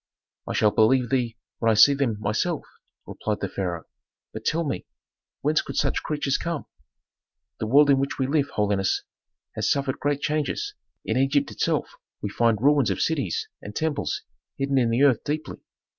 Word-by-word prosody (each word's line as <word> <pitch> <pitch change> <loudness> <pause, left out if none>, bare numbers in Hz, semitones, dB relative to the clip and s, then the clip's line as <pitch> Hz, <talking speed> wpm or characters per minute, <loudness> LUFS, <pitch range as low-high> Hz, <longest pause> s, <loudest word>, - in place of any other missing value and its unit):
"I - - -2
shall 105 - +3
believe 120 +4 +3
thee 120 -4 0 0.2
when 115 - +2
I 110 - +4
see 125 +7 +8
them 130 -7 -1
myself," 110 - -1 0.4
replied - - -3
the - - -2
pharaoh. 90 -4 -3 0.5
"But 110 0 -7
tell 165 +2 +1
me, 135 -11 -3 0.5
whence 150 +2 +2
could - - -8
such - - +1
creatures 145 -3 -1
come?" 170 -3 -3 0.9
"The 110 - -2
world 140 +4 +6
in 135 - +4
which 135 0 -2
we 130 - +1
live, 140 +1 +1
holiness, 100 -2 0 0.5
has - - -1
suffered 135 -2 0
great 145 -1 0
changes. 155 - -1 0.3
In 110 - 0
Egypt 135 +2 +2
itself - - 0 0.3
we 105 - -3
find 115 -1 +2
ruins 145 +2 +4
of - - -1
cities 140 - -1
and 105 +1 -9
temples 155 +1 -1 0.3
hidden 135 0 +1
in 120 -2 +2
the 120 +4 +2
earth 135 -5 +4
deeply. 155 +1 -4
135 Hz, 175 wpm, -25 LUFS, 110-145 Hz, 0.9 s, see